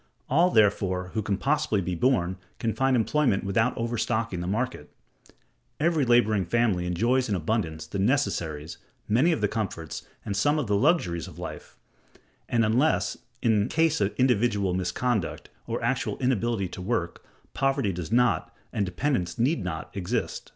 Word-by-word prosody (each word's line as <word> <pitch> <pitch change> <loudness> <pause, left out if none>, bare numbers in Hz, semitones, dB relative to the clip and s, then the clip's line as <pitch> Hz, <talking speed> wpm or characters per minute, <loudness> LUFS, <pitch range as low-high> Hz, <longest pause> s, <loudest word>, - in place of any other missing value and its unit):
All, 170 +6 +5
therefore, 95 - +2
who 110 - 0
can 100 -1 -1
possibly 140 -2 +1
be 90 -1 -2
born 95 -3 +1 0.2
can 115 -2 -1
find 135 -1 +2
employment 125 -2 +2
without 110 +5 +1
overstocking 115 -3 -1
the 90 - -4
market: 110 -5 -2 0.9
every 160 -2 +2
laboring 110 -5 +3
family 90 -2 +1
enjoys 120 +8 +1
in 100 - +1
abundance 80 -3 -2
the 95 +5 -5
necessaries, 85 - -1 0.3
many 125 +11 +3
of 160 - -1
the 105 - +3
comforts, 100 -7 -4 0.2
and 100 - -2
some 145 +10 +2
of 150 - 0
the 105 -1 +1
luxuries 100 - +1
of - - -12
life; - - -8 0.7
and, 115 -2 +3
unless 125 +9 +2 0.3
in 110 -2 +2
case 160 -1 +2
of 100 - 0
individual 110 -6 +2
misconduct, 95 +3 -1 0.2
or - - -2
actual - - -1
inability 120 -5 0
to 90 - -8
work, 90 -4 -2 0.3
poverty 135 -6 +1
does 85 +1 -6
not, 125 +1 +2 0.2
and 100 -2 0
dependence 90 -4 -1
need 135 +8 +1
not, - - -5
exist. 90 -3 -3
110 Hz, 155 wpm, -26 LUFS, 95-125 Hz, 0.9 s, All